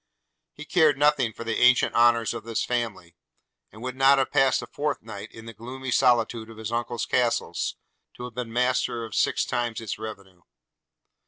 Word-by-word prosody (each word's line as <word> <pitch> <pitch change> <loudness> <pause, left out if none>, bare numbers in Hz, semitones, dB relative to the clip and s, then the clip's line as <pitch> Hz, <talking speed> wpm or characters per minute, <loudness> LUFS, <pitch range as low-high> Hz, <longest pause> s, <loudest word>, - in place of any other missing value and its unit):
He 150 - -9
cared 155 -5 +3
nothing 145 -5 +3
for 115 - -8
the 115 -1 -2
ancient 125 0 +4
honours 120 -1 +3
of 115 -2 -7
his 115 -1 -2
family; 110 -8 -3 0.6
and 110 +2 -12
would 130 0 -4
not 135 +1 +5
have 135 - 0
passed 135 -2 +3
a - - -5
fortnight 115 -9 -5
in 115 0 -12
the 115 - -9
gloomy 125 +4 -7
solitude 120 -2 +2
of 115 - -12
his 110 0 -5
uncle's 120 0 -2
castle, 120 -2 0 0.6
to - - -9
have 125 -1 -7
been 120 -1 -5
master 125 -1 0
of 110 - -10
six - - +1
times 120 -2 -2
its 110 -2 -5
revenue. 100 -5 -9
120 Hz, 180 wpm, -25 LUFS, 110-130 Hz, 0.6 s, not